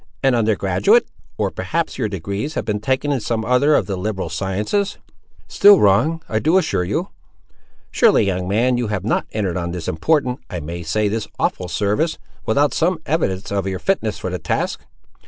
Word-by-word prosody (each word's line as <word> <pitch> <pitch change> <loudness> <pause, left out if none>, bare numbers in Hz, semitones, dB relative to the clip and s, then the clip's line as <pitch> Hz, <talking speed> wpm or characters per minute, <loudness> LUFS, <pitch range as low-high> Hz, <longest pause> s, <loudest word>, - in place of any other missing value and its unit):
"An 135 -1 +4
under 110 -2 +2
graduate!—or 100 - 0
perhaps 165 -4 -3
your 110 -4 0
degrees 100 - -4
have - - -2
been 105 -1 -1
taken 130 +6 0
in 140 - +1
some 110 0 -2
other 125 +5 +3
of - - +2
the 100 - -3
liberal 95 -2 -3
sciences?" 100 - -1 0.5
"Still 205 -1 +6
wrong, 150 +12 +3
I 110 - 0
do 160 +9 +3
assure 180 - +1
you." 90 - -2 0.8
"Surely, - - +4
young 90 -2 -1
man, 120 +5 +2
you 120 - -1
have 105 -3 -2
not 115 - 0
entered 100 -5 -2
on 85 -1 -3
this 90 -2 -5
important—I 125 - -1
may 85 +3 -6
say, 105 +6 0
this 110 +1 -2
awful 90 - -1
service, 105 - 0 0.3
without 140 +4 +2
some 175 +2 +1
evidence 100 - -1
of 100 -1 -1
your 95 -1 -2
fitness 115 - -1
for 90 - -4
the 90 - -3
task! 80 - -2
110 Hz, 180 wpm, -20 LUFS, 95-140 Hz, 0.8 s, Still